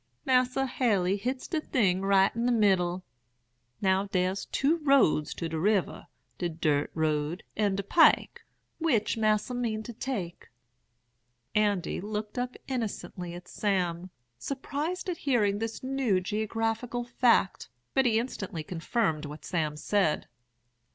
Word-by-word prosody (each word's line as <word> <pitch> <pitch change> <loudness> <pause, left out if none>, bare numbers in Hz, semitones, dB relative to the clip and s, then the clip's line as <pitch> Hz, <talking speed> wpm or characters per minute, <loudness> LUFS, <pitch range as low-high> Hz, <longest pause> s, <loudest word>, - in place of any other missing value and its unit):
'Mas'r 255 0 +2
Haley 205 -8 +1
hits 255 +6 -3
de 320 -3 -1
thing 190 -11 +1
right 195 0 +3
in 235 +1 0
de - - +3
middle. 185 -5 +2 0.8
Now, 190 +1 +2
der's 185 0 -1
two 300 +5 +1
roads 275 - +3
to 170 - -3
de 160 -1 -3
river, 200 +1 0 0.3
de 175 - -1
dirt 150 -3 0
road 155 +1 -1
and 205 -2 +1
der 200 - -2
pike. 325 - +4 0.4
Which 265 -11 +1
Mas'r 215 +2 +1
mean 225 -3 -2
to 240 - -8
take?' 210 -8 -5 1.0
"Andy 205 -5 +1
looked 210 +3 -4
up 250 0 -3
innocently 205 -8 -4
at 175 +1 -10
Sam, 180 -3 -1 0.3
surprised 295 - -3
at 355 -2 -2
hearing 210 -9 +1
this 225 +2 -4
new 260 -7 +1
geographical 225 +4 -2
fact; 240 -4 +2 0.2
but 265 -1 +3
he 220 -2 +3
instantly 195 -9 -3
confirmed 165 -1 -1
what 150 +1 -9
Sam 155 -4 -1
said. 190 0 +1
210 Hz, 135 wpm, -29 LUFS, 180-245 Hz, 1.0 s, pike